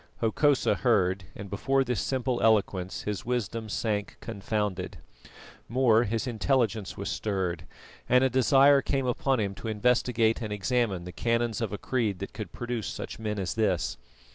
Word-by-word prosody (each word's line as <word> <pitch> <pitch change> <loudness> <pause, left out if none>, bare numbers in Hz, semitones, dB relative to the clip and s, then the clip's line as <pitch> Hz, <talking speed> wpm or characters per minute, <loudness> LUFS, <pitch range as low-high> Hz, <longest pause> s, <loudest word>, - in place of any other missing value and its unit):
Hokosa 135 +5 +2
heard, 95 -6 +1
and 100 - -7
before 135 +7 +1
this 125 -2 -1
simple 130 -2 -1
eloquence 100 -4 +1
his 105 -2 -3
wisdom 115 -2 -2
sank 105 -1 -2
confounded. 105 -3 -3 0.7
More, 120 -1 +4
his 115 +3 -1
intelligence 115 -4 0
was 100 - -4
stirred, 90 -6 -2 0.4
and 125 +1 +5
a 130 - +4
desire 135 +2 +5
came 135 -1 -1
upon 130 +1 +1
him 100 -2 -1
to 110 - -8
investigate 115 +1 +2
and 110 -2 -4
examine 105 -2 0
the 90 - -7
canons 115 +1 0
of 110 -4 -2
a 105 - -3
creed 110 -4 -1
that 100 - -7
could 105 -6 -6
produce 120 -3 -4
such - - -6
men 105 -1 -3
as 95 -3 -2
this. 105 -6 0
110 Hz, 160 wpm, -28 LUFS, 100-125 Hz, 0.7 s, and